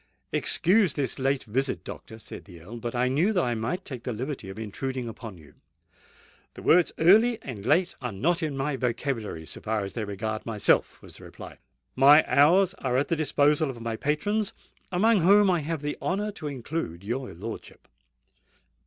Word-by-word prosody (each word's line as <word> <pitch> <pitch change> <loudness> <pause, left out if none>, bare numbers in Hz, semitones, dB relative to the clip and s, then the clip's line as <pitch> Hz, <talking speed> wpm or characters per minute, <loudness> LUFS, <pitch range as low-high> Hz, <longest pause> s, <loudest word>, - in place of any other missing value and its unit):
"Excuse 190 -2 +3
this 135 -2 -1
late 135 0 0
visit, 130 +5 -1
doctor," 110 - -9
said 110 - -10
the 90 -4 -13
Earl; 105 +9 -10
"but 120 +1 -5
I 125 +1 +2
knew 155 +11 +2
that 180 - +2
I 120 - 0
might 120 - -3
take 130 -4 -7
the 125 - -4
liberty 130 -2 -5
of 95 - -9
intruding 125 +4 -4
upon 115 -3 -8
you." 75 -3 -17 1.0
"The - - -10
words 175 +1 +4
early 220 +8 +5
and 115 -7 -7
late 175 +6 +3
are 125 -2 -3
not 165 - 0
in 150 -4 -2
my 135 0 -1
vocabulary, 120 - -3
so - - -9
far 110 -1 -1
as 100 - -6
they 115 - -3
regard 110 +2 -4
myself," 110 -3 +1
was - - -12
the - - -14
reply. - - -11 0.4
"My 145 +4 +7
hours 175 +6 +4
are 125 -2 0
at 140 - 0
the 165 - +2
disposal 150 -1 +2
of 125 -3 -7
my 115 -1 -3
patrons, 195 - -1 0.4
amongst 200 +1 +3
whom 200 +2 +6
I 175 - +2
have 155 0 -4
the 150 - -3
honour 205 +3 -1
to 155 -7 -7
include 130 - -5
your 125 +5 -4
lordship." 110 +6 -9
135 Hz, 190 wpm, -26 LUFS, 115-165 Hz, 1.0 s, My